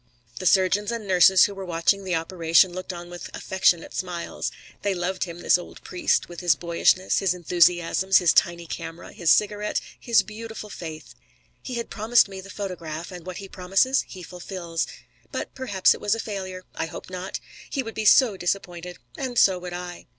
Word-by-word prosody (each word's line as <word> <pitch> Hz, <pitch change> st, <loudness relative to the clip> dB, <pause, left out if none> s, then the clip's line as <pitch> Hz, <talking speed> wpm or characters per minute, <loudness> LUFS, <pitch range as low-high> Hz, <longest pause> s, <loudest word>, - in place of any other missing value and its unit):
The 185 Hz, -, 0 dB
surgeons 195 Hz, +3 st, +3 dB
and 230 Hz, -3 st, -4 dB
nurses 185 Hz, 0 st, +6 dB
who 200 Hz, -, +2 dB
were 195 Hz, -1 st, -7 dB
watching 180 Hz, +3 st, +1 dB
the 185 Hz, -2 st, -1 dB
operation 165 Hz, +1 st, +3 dB
looked 185 Hz, +1 st, -5 dB
on 175 Hz, 0 st, -9 dB
with 175 Hz, -, -8 dB
affectionate 180 Hz, -3 st, +1 dB
smiles. 175 Hz, -2 st, -4 dB, 0.3 s
They 200 Hz, -2 st, 0 dB
loved 185 Hz, +2 st, -2 dB
him, 170 Hz, -1 st, -9 dB
this -, -, +4 dB
old 175 Hz, -, -11 dB
priest, 180 Hz, -, 0 dB
with 175 Hz, -1 st, -9 dB
his 175 Hz, -4 st, +3 dB
boyishness, 170 Hz, +3 st, +2 dB
his 185 Hz, -2 st, +1 dB
enthusiasms, 175 Hz, +2 st, +3 dB
his 175 Hz, -3 st, +4 dB
tiny 170 Hz, -1 st, +2 dB
camera, 165 Hz, +1 st, -7 dB
his 170 Hz, -2 st, 0 dB
cigarette, 210 Hz, +2 st, +2 dB, 0.2 s
his 235 Hz, -2 st, +3 dB
beautiful 215 Hz, 0 st, -8 dB
faith. 155 Hz, -8 st, -8 dB, 0.5 s
He 255 Hz, -, -6 dB
has 235 Hz, -1 st, -2 dB
promised 225 Hz, +2 st, +3 dB
me 195 Hz, -1 st, -8 dB
the 195 Hz, -, -12 dB
photograph 175 Hz, -5 st, -6 dB
and 180 Hz, -1 st, -10 dB
what 185 Hz, -, -5 dB
he 195 Hz, -, -7 dB
promises 195 Hz, +9 st, +1 dB
he 185 Hz, -2 st, -10 dB
fulfils. 175 Hz, -1 st, -4 dB, 0.4 s
But -, -, -4 dB
perhaps 205 Hz, -8 st, +3 dB
it -, -, -10 dB
was 205 Hz, +1 st, +2 dB
a -, -, -6 dB
failure. 190 Hz, -4 st, -5 dB
I -, -, -3 dB
hope 175 Hz, -, -9 dB
not. 185 Hz, +1 st, -5 dB, 0.3 s
He 270 Hz, -, -2 dB
would 225 Hz, -1 st, -7 dB
be 220 Hz, -, -3 dB
so 220 Hz, -2 st, +6 dB
disappointed 175 Hz, -1 st, -3 dB, 0.2 s
and 255 Hz, -3 st, -3 dB
so 190 Hz, -4 st, +5 dB
would 180 Hz, 0 st, -7 dB
I. 175 Hz, 0 st, -7 dB
185 Hz, 185 wpm, -25 LUFS, 175-200 Hz, 0.5 s, nurses